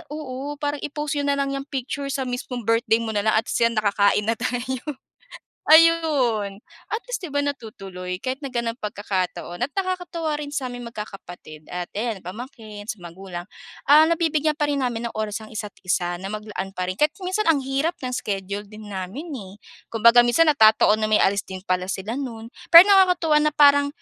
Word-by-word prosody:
oo, 285 -1 -5
parang 290 -1 -2
i-post 295 0 -3
niyo 285 - -1
na 280 - +2
lang 275 0 0
'yang 275 +1 -5
picture 275 +1 -4
sa 275 -1 -2
mismong 245 -1 -5
birthday 230 0 +2
mo 225 - -3
na 205 0 -1
lang 215 - +3
at 225 - +1
siya 230 0 +3
makakain 205 -1 +2
na 225 - +2
tayo," 250 +1 -2 0.9
ayun. 285 -11 +4 0.3
At 445 - -1
least - - -3
'di 290 - -9
ba, 285 - +2
natutuloy 195 -9 -5
kahit 260 0 -2
na 270 -2 -6
ganyang 235 0 -2
pagkakataon 200 -1 -3
at 285 - -13
nakakatuwa 355 -5 -2
rin 290 -1 -6
sa 265 -3 -2
aming 245 -1 -7
magkakapatid 175 -7 -9
at 180 0 -4
ayan 220 -4 -2
pamangkin 215 +1 -9
sa 215 -4 -6
magulang, 175 0 -8 0.4
ah, 305 +2 +8
nabibigyan 315 -2 +1
pa 295 -1 0
rin 285 - 0
namin 235 -1 -3
ng - - -15
oras 215 0 -3
ang 215 - -11
isa't-isa 180 -4 -3
na 195 - -5
maglaan 210 -2 -5
pa 180 -1 -3
rin. - - -1
Kahit 300 +4 +1
minsan 370 +1 0
ang 290 -4 +3
hirap 275 +6 -1
ng 255 0 -4
schedule 200 -2 -3
din 215 -1 -11
namin, 195 - -6
eh. 195 -3 -10 0.4
Kumbaga 235 +2 +6
minsan 305 +7 +4
natataon 220 -4 +5
na 215 - 0
may 215 - +4
alis 200 0 +2
din 190 -1 -8
pala 185 +1 -1
sila 195 +3 -3
no'n. 230 -4 -6 0.2
Pero 340 +3 +12
nakakatuwa 360 -5 +5
na 305 -1 +1
parang 285 -1 +6
235 Hz, 190 wpm, -23 LUFS, 205-290 Hz, 0.9 s, Pero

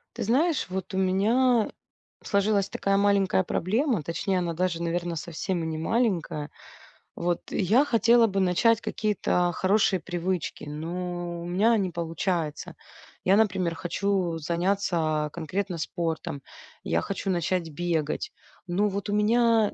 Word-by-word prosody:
Ты - - -3
знаешь, 285 - +2
вот 190 +1 -5
у 190 - -1
меня 220 +6 +3 0.5
сложилась 200 -1 +1
такая 195 0 0
маленькая 200 -2 +3
проблема. 215 - 0
Точнее, 180 +4 -1
она 170 -1 -2
даже, 170 0 -1
наверно, 170 0 -2
совсем 170 +1 -3
не 160 - -3
маленькая, 170 -6 -1 0.6
вот. 175 0 -1
Я 215 +9 +3
хотела 235 -2 +4
бы 195 -2 -1
начать 195 +5 +3
какие-то 210 -5 0
хорошие 190 0 +2
привычки, 175 0 -3
но 175 +3 -4
у - - -6
меня 200 +7 +3
не 195 -3 0
получается. 165 -2 -3 0.5
Я, 190 - +4
например, 190 -5 +2
хочу 180 0 -1
заняться 170 -2 0
конкретно 175 +2 -3
спортом, 160 -4 -3 0.4
я 80 +1 0
хочу 195 - -3
начать 175 -1 -1
бегать, 165 - -2 0.4
но 195 +4 +1
вот 200 +1 -4
у - - 0
меня 225 +1 +3
185 Hz, 130 wpm, -26 LUFS, 170-205 Hz, 0.6 s, хотела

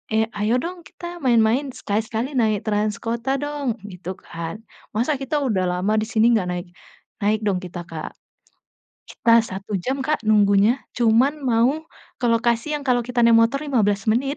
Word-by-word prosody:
"Eh, 220 0 +3
ayo 215 +4 +2
dong 355 +1 -5
kita 345 0 -9
main-main 235 +3 +3
sekali-kali 225 +5 -2
naik 215 -3 +1
trans 210 0 +1
kota 235 +4 -1
dong!" 290 -5 -2 0.2
gitu 180 +1 -7
kan. 170 +7 -7 0.3
"Masa 260 +5 0
kita 270 +3 -3
udah 190 -5 +1
lama 185 +4 0
di 215 - -3
sini 225 +1 +3
nggak 195 -5 +1
naik?" 175 0 -4 0.5
Naik 210 +1 +2
dong 185 -2 +1
kita, 175 -1 -7
Kak. 165 -2 -7 0.9
Kita 230 0 +4
1 195 -1 -7
jam, 265 +5 -2
Kak, 305 +2 0
nunggunya 205 +1 +5 0.2
cuman 245 +6 +3
mau 245 0 +3 0.5
ke 245 - +1
lokasi 235 +2 +1
yang 285 - -8
kalau 250 -2 +2
kita 245 -1 +1
naik 235 - +6
motor 235 +5 +2
15 205 -8 +1
menit. 270 +5 0
230 Hz, 165 wpm, -22 LUFS, 205-255 Hz, 0.9 s, naik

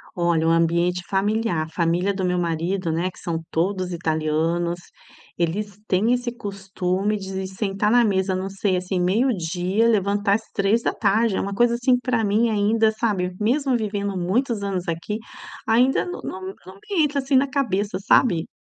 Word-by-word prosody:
Olha, 170 -3 +1
o - - +4
ambiente 170 +2 +2
familiar, 200 -3 0
a - - -13
família 175 +4 0
do 190 -1 -3
meu 180 0 +1
marido, 170 +1 -1
né, 170 +3 0
que - - -17
são 165 -1 -3
todos 185 +2 -1
italianos, 165 +1 0 0.6
eles 200 +4 -2
têm 210 +6 +2
esse 245 -1 -1
costume 195 -2 -2
de 190 -1 -5
sentar 195 +2 -1
na 240 0 +5
mesa, 190 -3 +1
não 190 +1 -3
sei, 195 -1 0
assim, 180 +1 -2
meio-dia 185 0 +1
levantar 200 -2 +2
às 220 +1 -5
13h, 215 +1 +1
é - - 0
uma 200 - -3
coisa 235 +3 +3
assim 250 +1 +3
para 250 -3 0
mim 215 +3 +2
ainda, 220 +1 +2
sabe, 200 -5 -1
mesmo 260 +5 +1
vivendo 200 -3 -2
muitos 205 +5 0
anos 190 -3 -3
aqui, 170 +6 -3 0.5
ainda 245 +4 +3
não 355 - -6
não 190 - -6 0.2
não 185 - -11
me 325 - -1
entra, 290 -1 0
assim, 270 0 0
na 270 +2 +4
cabeça, 210 -8 -1
sabe? 195 -4 +3
195 Hz, 170 wpm, -23 LUFS, 180-225 Hz, 0.6 s, na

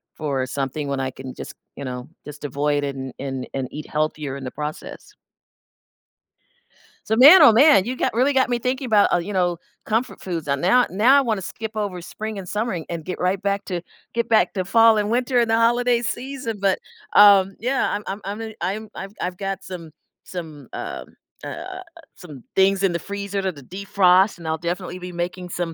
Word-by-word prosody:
for 140 -4 -2
something, 140 +2 -3
when 140 -1 -2
I 130 0 -2
can 130 0 -9
just, - - -8 0.2
you 140 - -7
know, 125 0 -6 0.2
just 150 0 -10
avoid 145 +1 0
it 140 -1 -3
and 130 -1 -6
and 135 -2 -4
and 135 -1 -2
eat 150 - -7
healthier 150 -2 -2
in 135 - -9
the 130 - -3
process. 150 0 -7 1.9
So, 220 - +1
man, 295 +10 +9
oh 290 - +9
man, 255 -4 +6
you 255 - -3
got - - -1
really 255 +5 +2
got 260 -1 +3
me 240 - 0
thinking 255 +2 -2
about, 210 -4 +4
uh - - +5
you 180 +4 -4
know, 175 -2 +1 0.3
comfort 225 +3 -1
foods, 165 -5 -4
uh, 140 - +2
now 190 - +3
now 230 +9 +5
I - - +5
wanna 220 -6 -1
skip 220 +3 -6
over 200 -4 -3
spring 215 +4 -6
and 185 -2 -7
summer, 215 +3 -2
an 165 -3 -5
and 170 -2 -5
get 185 - -5
right 185 +2 0
back 200 0 -1
to 180 -3 -3 0.3
get 235 0 -1
back 225 - +3
to 185 -2 -2
fall 225 +2 +5
and 210 0 0
winter 245 +2 +1
and 235 -1 +2
the 225 - +4
holiday 240 +1 +3
season, 240 -1 -4
but, 195 -1 +1 0.4
um, 200 -2 +7
yeah 255 +4 0
I'm 210 - -3
I'm 200 +2 -4 0.2
Imma - - -4
n - - -11
I'm 215 +3 -3
I've 195 +1 -7
I've 180 0 -3
got 195 -1 -4
some 170 -4 -8 0.3
some, 160 -6 -8
um - - -5 0.4
uh, - - -5
uh, 370 0 -7 0.4
some 150 -9 -12
things 195 0 +3
in 195 - +3
the 170 - -2
freezer 200 0 -4
to 190 -1 -2
de-defrost, 185 +5 +2
and 170 - -12
I'll 160 - 0
definitely 180 +2 -4
be 180 0 -8
making 180 +1 -4
some 170 -1 -3
190 Hz, 210 wpm, -22 LUFS, 160-225 Hz, 1.9 s, man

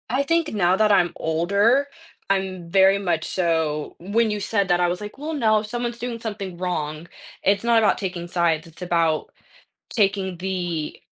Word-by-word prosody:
I 260 +4 +1
think 330 0 0
now 185 -3 +3
that 215 +1 +3
I'm 175 -4 +3
older, 200 - +2 0.4
I'm 190 -3 -1
very 195 +2 +5
much 175 -5 -1
so 160 -4 -1
when 215 +5 +1
you 210 - -2
said 200 0 0
that, 175 0 +3
I 175 - +3
was 180 +2 -2
like, 210 +3 -8
"Well, 305 +3 -4
no, 220 -7 +3
someone's 240 +2 -4
doing 235 -1 -4
something 205 -5 -5
wrong. 160 -3 -3 0.4
It's 200 +1 +2
not 235 -1 +4
about 220 -2 +3
taking 180 -3 -4
sides, 170 -2 0
it's 165 +2 -17
about 165 -3 0 0.6
taking 195 -3 0
the 175 -4 -3
190 Hz, 175 wpm, -23 LUFS, 175-215 Hz, 0.6 s, very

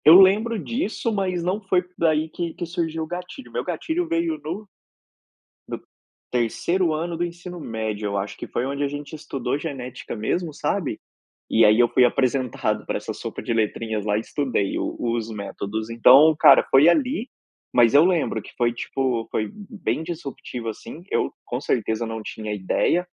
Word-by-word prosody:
Eu 165 +4 +10
lembro 215 +4 +5
disso, 185 - -2
mas 185 -4 -1
não 185 +5 -1
foi 190 -2 +2
daí 155 -1 +2
que 170 +1 -4
que - - -4
surgiu 165 -2 -2
o - - -6
gatilho. 180 - -7
Meu - - -2
gatilho 340 +1 -2
veio 335 -1 0
no 195 +7 -5 1.0
no - - -5 0.5
3º 160 - +1
ano 165 +2 -2
do 175 - 0
ensino 175 +1 -8
médio, 110 -6 -3
eu 100 0 -1
acho, 100 0 -4
que - - -6
foi 120 - -2
onde 140 +1 -2
a - - +2
gente 145 +1 -7
estudou 140 -3 -3
genética 130 -6 -6
mesmo, 155 +9 -2
sabe, 150 - -2 0.5
e 115 - +5
aí 105 +1 +6
eu 120 -1 +5
fui 125 - +5
apresentado 125 -4 0
pra - - -2
essa - - -5
sopa - - -6
de - - -1
letrinhas 110 -1 -1
lá 105 -1 +1
e - - 0
estudei 125 -6 -1
os - - -3
os 115 -1 -1
métodos. 105 +1 -4
Então, 130 +7 +7
cara, - - +8
foi 135 +4 +7
ali, 250 - +2 0.4
mas 120 -1 +5
eu 145 +3 +7
lembro 175 -5 +1
que - - -13
foi 120 -1 +2
tipo, 120 -1 -2
foi 110 -1 -1
bem 205 -5 -4
disruptivo 140 -7 -6
assim, 150 +9 -9
eu, - - 0
com 120 - -3
certeza 110 -4 0
não 115 0 -5
tinha 110 0 -5
ideia, 105 - +1
145 Hz, 180 wpm, -23 LUFS, 115-175 Hz, 1.0 s, Eu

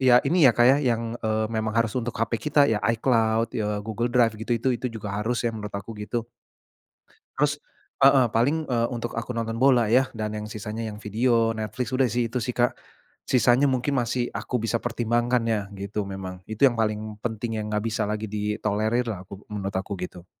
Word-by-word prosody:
ya 125 -1 +5
ini 155 0 +5
ya, 115 - +2
Kak, 120 - +5
ya, 130 +3 +7
yang 115 -2 -1
e 110 - -2 0.2
memang 110 0 -1
harus 115 -2 +2
untuk 120 0 -4
HP 115 0 -1
kita 145 -1 +5
ya, 110 -6 +1 0.2
iCloud, 115 -1 +2
ya 105 -1 -1
Google 115 +2 -1
Drive, 120 -2 +3
gitu 120 +1 0
itu 130 +3 +1
itu 125 +1 -2
juga 110 -3 -6
harus 120 +3 -1
ya 120 - +1
menurut 105 -2 -7
aku, 100 +3 -7
gitu. 110 +2 -4 1.1
Haus 145 0 +1 0.4
Heeh, 135 -2 +6
paling 140 +8 +1
e 125 - 0 0.2
untuk 120 -1 -4
aku 115 +2 -3
nonton 115 -1 -3
bola 125 -3 +4
ya 125 +4 +5
dan 110 -2 -4
yang 105 - -4
sisanya 110 +1 -5
yang 105 -1 -6
Vidio, 115 +1 +1
Netflix, 110 +4 -3
udah 135 - +3
sih 120 0 0
itu 120 - -7
sih, 125 - -2
Kak. 120 0 +1 0.5
Sisanya 125 +1 +4
mungkin 130 +2 0
masih 120 0 0
aku 125 - -2
bisa 115 +1 0
pertimbangkan 120 +1 0
ya, 110 -3 0
gitu 100 +1 -4
memang. 95 -2 -7
Itu 110 +7 +3
yang 120 - -5
paling 110 -1 -1
penting 115 -1 -2
yang 105 0 -4
enggak 105 +2 0
bisa 110 0 -1
lagi 105 +1 -3
ditolerir 105 +3 -1
lah 95 -4 -4
aku 100 +1 -10
menurut 100 -2 -4
aku 95 +2 -3
gitu. 90 -1 -7
115 Hz, 205 wpm, -25 LUFS, 105-120 Hz, 1.1 s, ya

